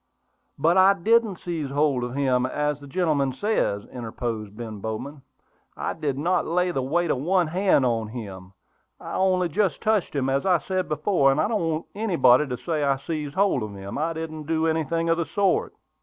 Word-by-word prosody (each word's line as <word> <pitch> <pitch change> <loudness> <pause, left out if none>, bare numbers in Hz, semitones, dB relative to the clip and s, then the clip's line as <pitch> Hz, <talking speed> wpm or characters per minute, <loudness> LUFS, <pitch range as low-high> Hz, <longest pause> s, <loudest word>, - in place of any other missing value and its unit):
"But 165 +6 +3
I 190 +1 +7
didn't 220 +2 +2
seize 165 -5 -4
hold 140 -3 +1
of 120 +1 -4
him, 130 -3 +1
as 150 +1 -1
the 140 - -10
gentleman 140 -4 0
says," 130 - -1
interposed 115 -3 -5
Ben 110 -3 -6
Bowman. 125 +8 -5 0.6
"I - - -2
did 145 -4 -3
not 175 +5 0
lay 180 +2 +1
the 135 - -1
weight 165 +6 0
of 130 - 0
one 180 +5 +2
hand 175 -4 +2
on 115 -3 0
him; 100 -5 -8 0.5
I - - -8
only 185 -1 +2
just 170 -1 0
touched 215 -7 0
him, 135 -2 0
as 135 +1 +1
I 185 -2 +4
said 185 +4 -3
before; 150 -2 +2
and 135 - 0
I - - +2
don't 215 -1 -1
want 155 0 -2
anybody 165 - +3
to 125 -2 -4
say 155 0 -2
I 140 -1 +2
seized 150 0 -5
hold 195 -9 +2
of 105 -2 -5
him. 100 +5 -6
I 165 +2 0
didn't 155 -2 -6
do 160 0 +1
anything 165 +1 0
of 165 0 +2
the 170 - 0
sort." 205 - 0
155 Hz, 200 wpm, -24 LUFS, 130-180 Hz, 0.6 s, I